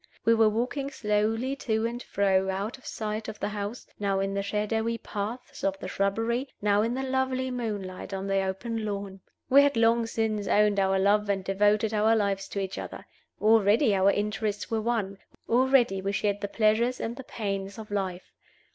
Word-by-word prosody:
We 230 - +6
were 225 -1 +5
walking 250 +6 -2
slowly 225 +2 0
to 220 -4 -1
and 240 +1 -3
fro, 190 -3 +1
out 200 +7 -3
of - - -14
sight 215 0 -4
of 215 - -7
the 205 - -1
house, 210 +3 -5
now 200 -1 0
in 195 0 -1
the 200 - 0
shadowy 215 +3 -1
paths 215 +3 -6
of 195 0 0
the - - -7
shrubbery, 225 +7 -1
now 205 0 +3
in 230 +3 0
the 265 - -2
lovely 260 0 -1
moonlight 205 -7 -4
on 195 0 -3
the 195 0 +1
open 220 +4 -3
lawn. 200 -2 -4 0.3
We 275 +2 +7
had 285 -3 +2
long 230 0 +3
since 220 -3 -1
owned 210 -1 +3
our 190 0 +2
love 205 +2 +2
and 195 -1 0
devoted 205 +3 +2
our 215 +1 +4
lives 200 -2 0
to 200 - -4
each 190 -1 -3
other. - - -7 0.3
Already 220 +2 +4
our 195 0 +4
interests 210 +1 -1
were 225 -1 +1
one; 215 -4 -1 0.3
already 245 -5 +3
we 195 +1 -2
shared 205 0 0
the 205 - -1
pleasures 225 +4 +2
and 230 +1 -3
the 265 - -8
pains 200 -3 -4
of 215 -2 -9
life. 190 -3 -3
210 Hz, 190 wpm, -27 LUFS, 200-230 Hz, 0.3 s, We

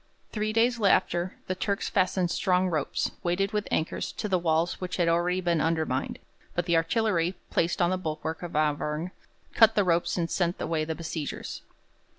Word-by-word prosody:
Three 215 0 -1
days 230 +1 +2
after, 185 -2 +2
the 185 - -1
Turks 200 +2 -2
fastened 185 -2 +1
strong 185 -1 +2
ropes, 155 -3 -1
weighted 190 +3 0
with 210 -1 -1
anchors, 160 - -1
to 215 - -3
the 185 -3 +2
walls 165 +1 0
which 185 -1 -3
had 175 -2 +2
already 175 +2 +2
been 170 -3 +1
undermined; 160 -5 0 0.4
but 175 - 0
the 170 -2 +2
artillery, 175 +1 +1 0.2
placed 170 +1 +1
on 175 - +2
the 185 - 0
bulwark 160 -1 -4
of 175 -3 -6
Auvergne, 150 +2 0 0.4
cut 225 -1 +6
the 205 - +4
ropes 175 0 +1
and 170 -2 0
sent 175 -1 0
away 155 -2 -1
the 160 0 -3
besiegers. 160 -3 -5
175 Hz, 175 wpm, -27 LUFS, 165-185 Hz, 0.4 s, cut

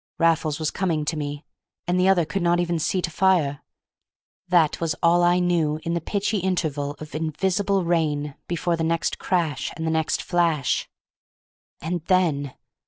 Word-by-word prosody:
Raffles 160 -2 +2
was 155 -1 -1
coming 165 -5 -1
to 160 - -1
me, 145 0 -5 0.4
and 180 +1 +1
the 185 - +3
other 185 -4 +4
could 175 +6 -3
not 175 0 +2
even 170 -1 0
see 180 +3 0
to 170 - -2
fire; 160 -6 +2 0.9
that 170 -4 +3
was 160 -2 0
all 170 +1 +5
I 175 0 +4
knew 170 -4 +1
in 170 - -2
the 170 - -1
pitchy 205 +4 -1
interval 155 -6 -1
of 155 -1 -10
invisible 190 +5 0
rain 150 -4 0
before 170 0 0
the 165 - -2
next 165 0 0
crash 165 -7 -1
and 160 - -3
the 160 - 0
next 160 -1 0
flash. 165 -6 +1 0.9
And 170 +1 -2
then! 155 -8 +1
165 Hz, 170 wpm, -24 LUFS, 155-180 Hz, 0.9 s, all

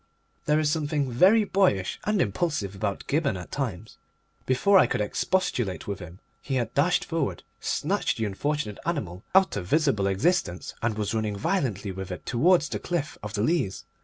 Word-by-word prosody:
There 150 +1 +3
is 150 -1 +2
something 150 -4 -1
very 195 - +5
boyish 185 - +1
and 210 -1 +1
impulsive 110 - -1
about 100 0 -3
Gibberne 140 - 0
at 90 - -9
times. 110 -7 -4 0.5
Before 190 +10 +5
I - - +5
could - - -1
expostulate 115 - -1
with 100 -2 -3
him 90 -1 -10 0.2
he 135 - -3
had 120 -3 -1
dashed 155 +6 +2
forward, 165 -5 -2 0.2
snatched - - -1
the 115 - -1
unfortunate 105 +2 -2
animal 105 - -3
out 190 0 +5
of 90 -3 -4
visible 140 - +2
existence, 95 - 0
and 115 -1 -1
was 105 -1 -1
running 110 -2 -1
violently 110 - -1
with 95 0 -6
it 90 - -7
towards 160 +6 +3
the - - -4
cliff 170 -4 -3
of 105 +1 -6
the 105 - 0
Leas. 145 - 0
125 Hz, 175 wpm, -26 LUFS, 100-160 Hz, 0.5 s, very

